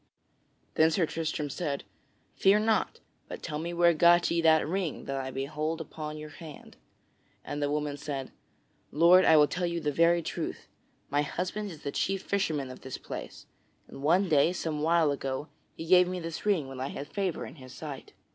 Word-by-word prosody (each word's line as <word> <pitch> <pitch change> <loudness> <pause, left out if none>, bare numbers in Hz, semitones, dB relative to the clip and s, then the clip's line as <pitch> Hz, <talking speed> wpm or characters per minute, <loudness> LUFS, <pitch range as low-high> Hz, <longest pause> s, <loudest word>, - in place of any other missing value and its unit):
Then 160 0 +5
Sir 165 +1 +2
Tristram 155 -2 -3
said: 145 -6 -3 0.5
"Fear 200 +2 +4
not, 220 0 +1 0.3
but - - -8
tell 150 -2 -4
me 170 +2 -4
where 170 0 +4
got 175 +2 +5
ye 170 0 +2
that 160 -2 +4
ring 180 -2 -2
that 135 - -3
I 130 -1 -3
behold 150 +5 -3
upon 155 -1 -6
your 150 0 -8
hand?" 155 -3 -12 0.7
And 145 0 -4
the 145 - +1
woman 150 -1 -2
said: 140 -2 -5 0.6
"Lord, 175 +4 +6
I 160 - +7
will 150 - +7
tell 175 +4 -2
you 170 0 -2
the 150 -2 -1
very 170 +3 +3
truth. - - -5 0.4
My 145 +1 +2
husband 185 +7 -3
is 160 -5 -11
the 140 - -3
chief 195 +4 -1
fisherman 155 -9 -1
of 130 - -11
this 130 - -6
place, - - -8 0.4
and 135 - -11
one 175 +7 +3
day, 155 +2 +4
some 155 -4 -3
while 160 -1 +3
ago, 135 +1 -4 0.3
he 165 - -7
gave 180 +1 +6
me 180 0 -3
this 165 +4 -6
ring 175 -9 +2
when 135 -1 -8
I 130 - -2
had 140 - -6
favor 195 -4 -2
in - - -11
his 130 -2 -12
sight." 145 -1 -8
160 Hz, 195 wpm, -29 LUFS, 145-175 Hz, 0.7 s, I